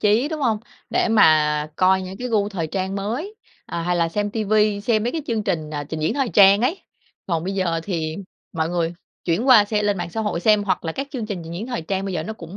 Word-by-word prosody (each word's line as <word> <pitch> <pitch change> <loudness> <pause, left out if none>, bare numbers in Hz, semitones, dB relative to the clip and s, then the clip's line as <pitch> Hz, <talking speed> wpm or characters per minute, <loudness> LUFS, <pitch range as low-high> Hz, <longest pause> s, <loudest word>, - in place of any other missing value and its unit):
chí, 215 +7 +3
đúng 315 -1 -4
hông? 230 -6 +1 0.3
Để - - +1
mà 155 -8 +4
coi 190 0 +3
những 185 +1 -7
cái 250 - -4
gu 210 -3 +1
thời 180 -6 -3
trang 190 +3 -3
mới, 235 - -3 0.3
ờ, 170 - -4
hay 175 +1 0
là 170 -1 +2
xem 205 +4 -2
TV 215 -1 -3 0.3
xem 220 -2 +1
mấy 240 - -1
cái 320 - -3
chương 225 -3 -1
trình, 165 -7 -2
à, 145 -1 -4
trình 155 +2 -5
diễn 155 +8 0
thời 270 -3 0
trang 200 -1 +6
ấy. 315 +11 0 0.4
Còn 165 -3 -1
bây 195 +2 -3
giờ 170 -4 0
thì 160 -4 -3 0.4
mọi 160 -2 -1
người 170 -1 -1 0.3
chuyển 185 +10 0
qua 230 -5 +8
xe 210 0 -1
lên 205 -1 +1
mạng 175 -1 -4
xã 220 - -3
hội 210 -5 -1
xem, 210 +1 +4
hoặc 195 - -1
là 160 - -2
các 275 +8 -4
chương 250 -7 -4
trình 205 -4 -4
trình 165 - -8
diễn 200 +7 -5
thời 245 -8 -3
trang 190 +4 -2
bây 195 -2 -3
giờ 160 - -1
nó 220 - -5
cũng 175 -3 -10
195 Hz, 265 wpm, -22 LUFS, 170-220 Hz, 0.4 s, qua